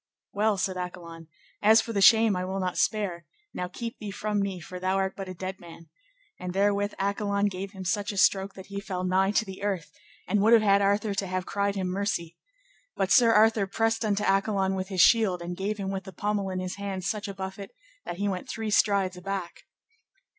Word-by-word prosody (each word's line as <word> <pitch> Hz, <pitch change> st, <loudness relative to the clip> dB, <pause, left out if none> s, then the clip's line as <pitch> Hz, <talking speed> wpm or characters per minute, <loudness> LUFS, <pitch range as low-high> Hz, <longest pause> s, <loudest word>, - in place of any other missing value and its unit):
Well, 210 Hz, 0 st, +1 dB
said 190 Hz, -1 st, -1 dB
Accolon, 170 Hz, -2 st, -7 dB, 0.3 s
as 220 Hz, +2 st, +6 dB
for 230 Hz, -, -3 dB
the 200 Hz, -, 0 dB
shame 220 Hz, 0 st, +6 dB
I 180 Hz, -, -2 dB
will 190 Hz, +1 st, -3 dB
not 185 Hz, -1 st, -2 dB
spare, 185 Hz, -7 st, -1 dB, 0.3 s
now 180 Hz, -, -3 dB
keep 230 Hz, +5 st, -7 dB
thee 210 Hz, -, -6 dB
from 210 Hz, +1 st, -2 dB
me, 195 Hz, -2 st, -2 dB
for 180 Hz, +2 st, -8 dB
thou 185 Hz, +1 st, 0 dB
art 195 Hz, 0 st, 0 dB
but 195 Hz, -1 st, -6 dB
a 185 Hz, -, -7 dB
dead 185 Hz, +2 st, -6 dB
man. 170 Hz, -2 st, -13 dB, 0.5 s
And 180 Hz, 0 st, -5 dB
therewith 205 Hz, +1 st, +1 dB
Accolon 200 Hz, +1 st, 0 dB
gave 195 Hz, +1 st, -6 dB
him 190 Hz, -1 st, -8 dB
such 205 Hz, +2 st, -1 dB
a 200 Hz, -, -7 dB
stroke 195 Hz, +1 st, +3 dB
that 190 Hz, -, -10 dB
he 200 Hz, 0 st, -6 dB
fell 185 Hz, -3 st, -4 dB
nigh 185 Hz, +1 st, +2 dB
to 210 Hz, +2 st, +1 dB
the 190 Hz, -1 st, -9 dB
earth, 195 Hz, -5 st, -2 dB, 0.4 s
and 210 Hz, -, +2 dB
would 220 Hz, +3 st, +5 dB
have 225 Hz, -2 st, +6 dB
had 200 Hz, -1 st, +4 dB
Arthur 205 Hz, +1 st, +1 dB
to 195 Hz, 0 st, -2 dB
have 185 Hz, 0 st, -2 dB
cried 200 Hz, 0 st, -1 dB
him 190 Hz, -1 st, -2 dB
mercy. 180 Hz, -3 st, -2 dB, 0.6 s
But 195 Hz, -1 st, -1 dB
Sir 235 Hz, -3 st, +6 dB
Arthur 220 Hz, -2 st, +4 dB
pressed 225 Hz, +3 st, 0 dB
unto 210 Hz, -1 st, 0 dB
Accolon 195 Hz, -1 st, +1 dB
with 190 Hz, 0 st, -3 dB
his 190 Hz, -3 st, +1 dB
shield, 205 Hz, -2 st, +5 dB
and 175 Hz, +1 st, -5 dB
gave 200 Hz, +3 st, -2 dB
him 195 Hz, -1 st, -3 dB
with 195 Hz, -1 st, -4 dB
the 190 Hz, -, -9 dB
pommel 205 Hz, +1 st, -1 dB
in 185 Hz, -, -3 dB
his 185 Hz, +1 st, -4 dB
hand 195 Hz, -2 st, -4 dB
such 205 Hz, +2 st, -2 dB
a 200 Hz, -, -5 dB
buffet 190 Hz, +1 st, -6 dB, 0.3 s
that 175 Hz, -, -6 dB
he 200 Hz, +2 st, -1 dB
went 185 Hz, -2 st, -4 dB
three 220 Hz, -2 st, -3 dB
strides 195 Hz, -3 st, +2 dB
aback. 185 Hz, -1 st, -6 dB
195 Hz, 220 wpm, -27 LUFS, 185-205 Hz, 0.6 s, as